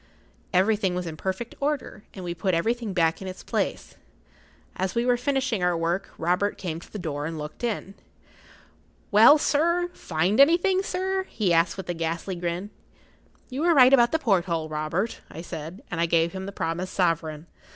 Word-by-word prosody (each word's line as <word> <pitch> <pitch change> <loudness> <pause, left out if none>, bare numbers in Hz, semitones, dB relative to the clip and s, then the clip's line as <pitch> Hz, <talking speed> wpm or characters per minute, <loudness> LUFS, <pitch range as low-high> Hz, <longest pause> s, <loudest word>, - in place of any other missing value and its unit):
Everything 195 0 +2
was 180 0 -3
in 160 -2 -5
perfect 190 +8 -4
order, 285 -7 -2
and 185 -2 -7
we 175 - -3
put 180 +1 0
everything 225 +5 -1
back 165 -2 +1
in 190 - -6
its 185 0 -8
place. - - -3 0.8
As 185 -1 -2
we 235 +1 +1
were 250 -1 +4
finishing 260 -4 -1
our 180 -1 +2
work, 170 +3 -1
Robert 180 +5 0
came 165 -3 -4
to - - -15
the - - -6
door 150 -5 -3
and 165 0 -5
looked 150 +8 -8
in. 215 -4 -2 1.2
"Well, 225 +8 +8
sir—find 295 - 0
anything, 345 +6 +5
sir?" 380 0 -2
he 195 -6 0
asked 165 +2 +2
with 190 - -6
a 175 - -1
ghastly 165 +3 -3
grin. 175 +3 -4 0.8
"You 265 +3 -3
were 340 0 +4
right 260 -1 +7
about 240 -3 +6
the 320 - +2
porthole, 175 - 0
Robert," 155 +8 -2
I 165 - -8
said, 165 +3 -8
and 170 -1 -1
I 170 - +2
gave 165 0 +2
him 190 +1 -6
the - - -5
promised 180 0 -3
sovereign. 165 -3 0
185 Hz, 180 wpm, -25 LUFS, 170-240 Hz, 1.2 s, Well